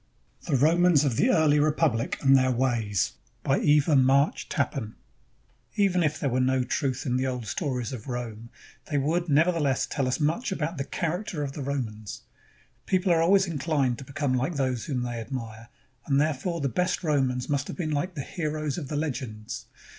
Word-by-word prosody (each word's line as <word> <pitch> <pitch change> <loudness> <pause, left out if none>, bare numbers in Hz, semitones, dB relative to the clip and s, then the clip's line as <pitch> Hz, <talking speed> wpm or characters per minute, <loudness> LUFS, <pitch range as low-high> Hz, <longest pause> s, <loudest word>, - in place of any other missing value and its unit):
THE 150 - +1
ROMANS 160 +2 +4
OF 130 -5 +1
THE 240 - +3
EARLY 155 - +4
REPUBLIC 150 -6 +1
AND 135 0 +6
THEIR 130 -1 +3
WAYS 115 -5 0 0.3
BY 135 - +2
EVA 150 +1 +4
MARCH 135 +2 +3
TAPPAN 110 -7 -2 0.8
Even 195 -3 +2
if 155 -1 0
there 140 - -1
were 125 - +1
no 130 0 +2
truth 130 +1 -2
in 125 -2 0
the 130 +1 0
old 125 -3 -3
stories 125 - -3
of 120 -1 -8
Rome, 120 -2 -5 0.4
they 145 - 0
would, 165 +5 0
nevertheless, 150 -2 +2
tell 135 -3 -2
us 130 - -1
much 165 - 0
about 165 -3 -3
the 135 - -2
charac 175 +7 -3
ter 150 -6 -3
of 140 - -3
the 145 - -7
Romans. 115 -7 -4 0.6
People 185 -1 +2
are 165 - +3
always 190 +3 +4
inclined 145 -6 0
to - - -7
become 140 0 -2
like 130 +7 0
those 130 -4 -1
whom 125 -4 -2
they 120 -1 -4
admire, 115 -1 -7 0.4
and 140 -2 +3
therefore 155 +3 -1
the 140 - +1
best 180 - -1
Romans 130 -5 0
must 140 -1 -1
have - - -7
been 160 -4 -2
Hke 175 +5 -2
the 140 - -3
heroes 155 0 -3
of 145 - -6
the 150 - -4
legends. 125 -8 -4
140 Hz, 190 wpm, -27 LUFS, 125-155 Hz, 0.8 s, AND